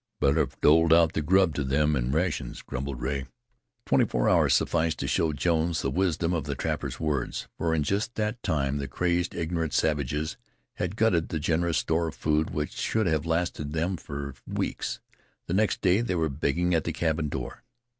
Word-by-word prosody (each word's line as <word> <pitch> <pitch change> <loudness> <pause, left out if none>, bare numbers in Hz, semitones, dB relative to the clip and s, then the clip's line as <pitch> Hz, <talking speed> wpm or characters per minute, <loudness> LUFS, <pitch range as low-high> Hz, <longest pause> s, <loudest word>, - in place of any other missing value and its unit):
"Better 70 +3 +3
have - - -1
doled 80 +2 +5
out 80 -1 +5
the - - 0
grub 95 +2 +3
to 75 - -1
them 75 +3 +2
in 65 -1 -1
rations," 75 -5 -1
grumbled 65 -1 -5
Rea. 70 +1 -2 0.6
Twenty - - +4
four - - 0
hours - - +4
sufficed 80 -1 +1
to - - -3
show 80 - +1
Jones 80 +1 0
the - - 0
wisdom 85 -2 0
of 80 -5 -1
the - - -3
trapper's - - -3
words, 75 -5 -2
for 80 -1 0
in 75 - +1
just 100 +9 -1
that 110 +2 -2
time 70 -2 0
the 70 - -3
crazed, 85 +5 0
ignorant 80 -2 -2
savages 75 +1 0 0.4
had 90 +2 -2
glutted 100 -7 +2
the 80 - -2
generous 85 +2 +1
store 80 +1 +1
of 80 - -6
food, 75 0 +1
which 75 -1 -3
should 110 -1 0
have 80 -2 0
lasted 80 -3 -1
them 85 +4 0
for 70 -4 -6
weeks. - - -3 0.5
The 85 - -3
next 105 +2 +1
day 95 +3 +3
they 115 -6 -1
were 80 -2 +1
begging 80 +5 0
at 80 - +1
the 85 - -2
cabin 80 -1 0
door. 70 -5 -6
80 Hz, 195 wpm, -27 LUFS, 75-85 Hz, 0.6 s, doled